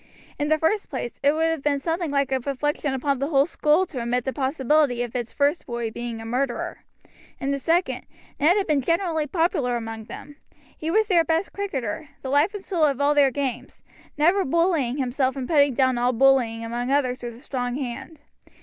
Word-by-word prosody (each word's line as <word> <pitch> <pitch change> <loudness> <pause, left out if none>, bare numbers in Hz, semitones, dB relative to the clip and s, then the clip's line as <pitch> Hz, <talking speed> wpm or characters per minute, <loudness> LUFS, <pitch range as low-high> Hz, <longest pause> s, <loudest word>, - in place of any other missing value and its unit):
In 295 0 0
the 310 - +4
first 355 +7 0
place, 250 -3 -5
it 285 +1 +4
would 320 +1 +1
have 325 -2 0
been 285 0 +1
something 330 +3 -2
like 280 -1 0
a 265 - +2
reflection 280 +1 -2
upon 275 0 0
the 275 - -1
whole 280 -3 +3
school 315 +2 +2
to 270 -8 -6
admit 240 +1 -1
the 265 - -2
possibility 270 -2 +1
of 240 0 -7
its 240 -2 -3
first 290 +4 0
boy 235 -2 -3
being 235 0 -5
a 225 - -8
murderer; 245 +2 -2 0.6
in 275 - -1
the 280 - -1
second, 335 +6 0 0.3
Ned 320 +7 +4
had 400 - +1
been 300 -3 +1
generally 335 0 0
popular 295 -6 0
among 225 -1 -6
them, 290 +5 -10 0.4
he 315 - -4
was 435 +5 +3
their 355 -5 +3
best 325 +3 -1
cricketer, 290 - -4
the 265 - -4
life 300 +9 +3
and 395 - -7
soul 335 -5 +2
of 280 -3 0
all 285 +1 +3
their 285 -2 +5
games, 265 -2 -4 0.3
never 350 +6 +3
bullying 320 -5 +1
himself 265 0 0
and 260 -2 -4
putting 285 -5 +3
down 260 -2 +2
all 245 +1 +2
bullying 240 -3 +3
among 240 +2 -3
others 255 -3 +1
with 240 -1 -6
a - - -14
strong 250 -3 -3
hand. 270 +3 -6
280 Hz, 205 wpm, -24 LUFS, 250-315 Hz, 0.6 s, their